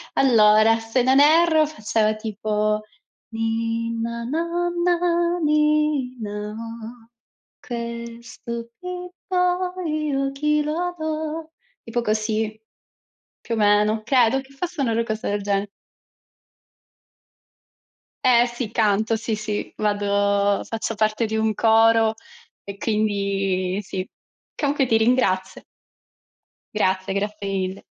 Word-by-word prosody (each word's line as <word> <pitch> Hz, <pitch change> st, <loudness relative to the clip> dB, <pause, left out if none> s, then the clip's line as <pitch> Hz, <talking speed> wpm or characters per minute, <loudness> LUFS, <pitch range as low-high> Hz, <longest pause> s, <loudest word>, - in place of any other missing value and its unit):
Allora, 225 Hz, -3 st, +5 dB
se 225 Hz, +2 st, 0 dB
non 265 Hz, +2 st, +4 dB
erro 315 Hz, +1 st, +5 dB
faceva 215 Hz, -7 st, 0 dB
tipo: 215 Hz, 0 st, -1 dB, 0.5 s
"Ninna 230 Hz, +1 st, -2 dB
nanna, 345 Hz, +3 st, 0 dB
ninna 275 Hz, -9 st, 0 dB
oh, 230 Hz, 0 st, -9 dB, 0.5 s
questo 235 Hz, 0 st, -6 dB
bimbo 360 Hz, 0 st, -2 dB
io 300 Hz, -3 st, -1 dB
a -, -, -3 dB
chi 300 Hz, +2 st, +1 dB
lo 350 Hz, +4 st, -2 dB
do?" 315 Hz, 0 st, -4 dB, 0.3 s
tipo 235 Hz, +1 st, -2 dB
così, 215 Hz, 0 st, -1 dB, 0.8 s
più 230 Hz, -, -4 dB
o -, -, -2 dB
meno, 210 Hz, +1 st, +3 dB
credo 255 Hz, +1 st, +3 dB
che 270 Hz, +1 st, -17 dB
fosse 345 Hz, +3 st, -5 dB
una 240 Hz, -4 st, +1 dB
ro 230 Hz, -, +1 dB
cosa 220 Hz, -1 st, -3 dB
del 205 Hz, 0 st, -1 dB
genere. 200 Hz, 0 st, -1 dB, 2.6 s
Eh, 240 Hz, -1 st, +5 dB
sì, 240 Hz, -2 st, -5 dB
canto, 220 Hz, 0 st, +2 dB
sì, 225 Hz, 0 st, -2 dB
sì. 215 Hz, -1 st, -4 dB
Vado 200 Hz, -1 st, +1 dB
faccio 225 Hz, 0 st, -4 dB
parte 215 Hz, +2 st, +1 dB
di 220 Hz, 0 st, -2 dB
un 220 Hz, 0 st, +1 dB
coro 225 Hz, 0 st, +4 dB, 0.5 s
e 200 Hz, -, -7 dB
quindi 200 Hz, -3 st, -1 dB
sì. 185 Hz, 0 st, -4 dB, 0.5 s
Comunque 285 Hz, -2 st, +1 dB
ti 225 Hz, -, +4 dB
ringrazio. 205 Hz, -5 st, +1 dB, 1.1 s
Grazie, 190 Hz, -1 st, 0 dB
grazie 205 Hz, 0 st, -3 dB
mille. 190 Hz, -1 st, -3 dB
230 Hz, 105 wpm, -23 LUFS, 210-285 Hz, 2.6 s, Allora